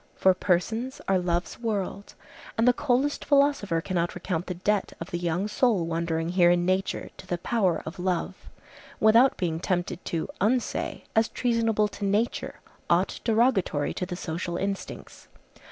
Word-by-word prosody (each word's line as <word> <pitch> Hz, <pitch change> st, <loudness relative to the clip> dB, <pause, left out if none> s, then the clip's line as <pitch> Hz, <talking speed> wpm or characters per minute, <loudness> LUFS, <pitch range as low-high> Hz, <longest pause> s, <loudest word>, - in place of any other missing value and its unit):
For 190 Hz, -, +4 dB
persons 220 Hz, +8 st, -1 dB
are 190 Hz, -1 st, +3 dB
love's 175 Hz, 0 st, -2 dB
world, 205 Hz, -3 st, -3 dB, 0.4 s
and 225 Hz, +2 st, +3 dB
the 250 Hz, -, +7 dB
coldest 275 Hz, +2 st, 0 dB
philosopher 280 Hz, -, +2 dB
cannot 175 Hz, -1 st, -1 dB
recount 180 Hz, -1 st, -3 dB
the 180 Hz, -, -3 dB
debt 200 Hz, +3 st, 0 dB
of 165 Hz, -, -7 dB
the 175 Hz, -, -2 dB
young 175 Hz, +3 st, -1 dB
soul 215 Hz, -5 st, +2 dB
wandering 165 Hz, 0 st, -1 dB
here 175 Hz, -1 st, +4 dB
in 175 Hz, 0 st, +3 dB
nature 185 Hz, +1 st, -1 dB
to -, -, -12 dB
the 175 Hz, -, -1 dB
power 190 Hz, -2 st, 0 dB
of 160 Hz, +3 st, -7 dB
love, 185 Hz, +1 st, -2 dB, 0.5 s
without 230 Hz, +5 st, +5 dB
being 165 Hz, -3 st, -1 dB
tempted 175 Hz, 0 st, -2 dB
to 165 Hz, -2 st, -2 dB
unsay, 235 Hz, +4 st, 0 dB
as 220 Hz, 0 st, +4 dB
treasonable 225 Hz, -3 st, +1 dB
to 205 Hz, -, -8 dB
nature, 205 Hz, +4 st, -1 dB, 0.3 s
aught -, -, +2 dB
derogatory 220 Hz, -, +2 dB
to 180 Hz, -, -3 dB
the 180 Hz, -, -4 dB
social 170 Hz, 0 st, -4 dB
instincts. 195 Hz, +1 st, -5 dB
190 Hz, 155 wpm, -26 LUFS, 175-225 Hz, 0.5 s, the